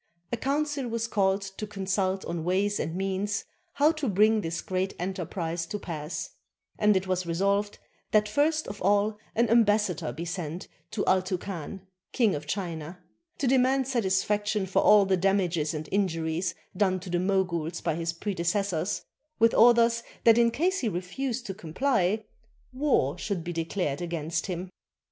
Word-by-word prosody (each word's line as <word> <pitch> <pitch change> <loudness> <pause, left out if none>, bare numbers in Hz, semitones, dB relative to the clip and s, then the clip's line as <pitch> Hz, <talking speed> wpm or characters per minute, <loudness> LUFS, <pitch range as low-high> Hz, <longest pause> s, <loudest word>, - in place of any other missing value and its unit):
A 240 - 0
council 285 +1 -1
was 230 0 -2
called 195 -2 +1
to 195 +2 -6
consult 190 -1 -1
on 170 -1 -3
ways 195 +4 +1
and 165 - -2
means 195 +2 -1 0.3
how 295 +2 +4
to 310 -4 -3
bring 215 +3 +4
this 165 -2 -3
great 190 +1 -2
enterprise 175 -2 -3
to 210 - -3
pass; 160 -5 -5 0.5
and 210 -2 +4
it 190 - -2
was 185 -1 -1
resolved 200 +4 0 0.3
that 210 0 +3
first 305 +7 +1
of 205 +1 -7
all 205 +2 +2 0.2
an 235 +1 +3
ambassador 210 - +3
be 160 +8 -6
sent 175 -1 -5 0.2
to - - -2
Altouncan, 185 -1 -1 0.3
King 225 -6 +3
of 145 0 -5
China, 170 -2 -4 0.4
to 275 - -1
demand 260 +1 +3
satis 195 -8 +1
faction 210 -1 0
for 190 - +2
all 210 -1 +6
the 190 -1 +2
damages 180 -5 +1
and 155 -1 -5
injuries 170 -3 0 0.2
done 185 -1 +2
to 180 0 -8
the 175 - +1
Moguls 175 -3 0
by 165 - -1
his 165 +1 -2
predecessors, 185 0 -1 0.3
with 230 0 +4
orders 235 0 +5 0.2
that 230 0 +6
in 235 0 +5
case 365 +10 0
he 235 - 0
refused 235 +7 -3
to 195 - -4
comply, 205 - 0 0.5
war 255 - +1
should 195 -6 -2
be 175 +1 -4
declared 165 -3 -2
against 165 -1 -2
him. 180 0 -4
195 Hz, 160 wpm, -28 LUFS, 175-215 Hz, 0.5 s, all